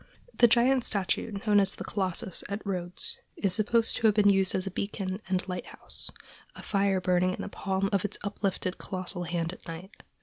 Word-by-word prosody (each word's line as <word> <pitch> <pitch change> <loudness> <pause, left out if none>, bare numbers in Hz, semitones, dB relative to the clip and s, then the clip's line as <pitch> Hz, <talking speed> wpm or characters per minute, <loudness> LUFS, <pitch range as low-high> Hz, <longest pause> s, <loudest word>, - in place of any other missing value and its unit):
The 240 - +6
giant 245 +2 +4
statue 200 +2 -1
known 205 -1 +5
as 195 -1 +1
the - - -6
Colossus, 185 -2 -2
at 200 +2 -4
Rhodes, 180 -2 -2 0.2
is 195 -3 +1
supposed 225 +1 +2
to 225 - +4
have 210 - +4
been 205 -1 +5
used 195 -1 +2
as 185 - -1
a 195 - -3
beacon 195 0 -3
and 185 0 0
lighthouse, 180 -1 -1 0.5
a - - -9
fire 195 -1 +2
burning 180 0 +2
in - - -7
the - - -4
palm 195 0 -1
of 195 - +2
its 205 - -2
uplifted 195 -2 -2
colossal 185 -1 -3
hand 170 0 -2
at - - -14
night. 170 +5 -8
195 Hz, 195 wpm, -29 LUFS, 185-205 Hz, 0.5 s, The